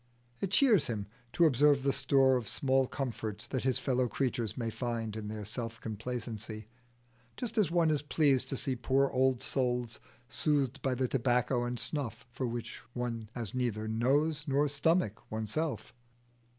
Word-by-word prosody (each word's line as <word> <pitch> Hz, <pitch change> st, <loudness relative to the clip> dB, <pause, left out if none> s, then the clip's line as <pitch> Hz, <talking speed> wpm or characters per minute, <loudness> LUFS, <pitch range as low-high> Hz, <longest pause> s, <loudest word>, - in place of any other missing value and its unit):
It 195 Hz, -, -2 dB
cheers 215 Hz, -, +4 dB
him 105 Hz, -4 st, -3 dB, 0.3 s
to 170 Hz, -, +4 dB
observe 145 Hz, -1 st, +4 dB
the 140 Hz, 0 st, +2 dB
store 135 Hz, -1 st, +4 dB
of 120 Hz, -4 st, -2 dB
small 135 Hz, -1 st, +2 dB
comforts 115 Hz, -5 st, -4 dB
that 130 Hz, +1 st, -3 dB
his 130 Hz, -2 st, +4 dB
fellow 130 Hz, -2 st, +1 dB
creatures 120 Hz, -2 st, -2 dB
may 115 Hz, -2 st, -2 dB
find 115 Hz, -3 st, -3 dB
in 110 Hz, -1 st, -5 dB
their 105 Hz, -1 st, -5 dB
self 115 Hz, +2 st, -5 dB
complacency, 110 Hz, -1 st, -5 dB, 0.7 s
just 235 Hz, -2 st, -3 dB
as 210 Hz, -8 st, +3 dB
one 170 Hz, -2 st, +3 dB
is 150 Hz, -, +1 dB
pleased 140 Hz, -3 st, +2 dB
to 135 Hz, -, -2 dB
see 130 Hz, 0 st, 0 dB
poor 135 Hz, +3 st, +2 dB
old 130 Hz, -1 st, +2 dB
souls 125 Hz, -3 st, 0 dB, 0.3 s
soothed 140 Hz, -3 st, 0 dB
by 130 Hz, -1 st, 0 dB
the 130 Hz, +1 st, 0 dB
tobacco 125 Hz, 0 st, +1 dB
and 120 Hz, 0 st, -3 dB
snuff 130 Hz, -8 st, -3 dB
for 130 Hz, +1 st, -3 dB
which 120 Hz, 0 st, -5 dB
one 115 Hz, -3 st, -4 dB
has 115 Hz, -5 st, -3 dB
neither 115 Hz, -4 st, -1 dB
nose 145 Hz, +7 st, +1 dB
nor 140 Hz, +2 st, +2 dB
stomach 145 Hz, -, +1 dB
oneself. 110 Hz, +2 st, -2 dB
125 Hz, 165 wpm, -31 LUFS, 115-140 Hz, 0.7 s, cheers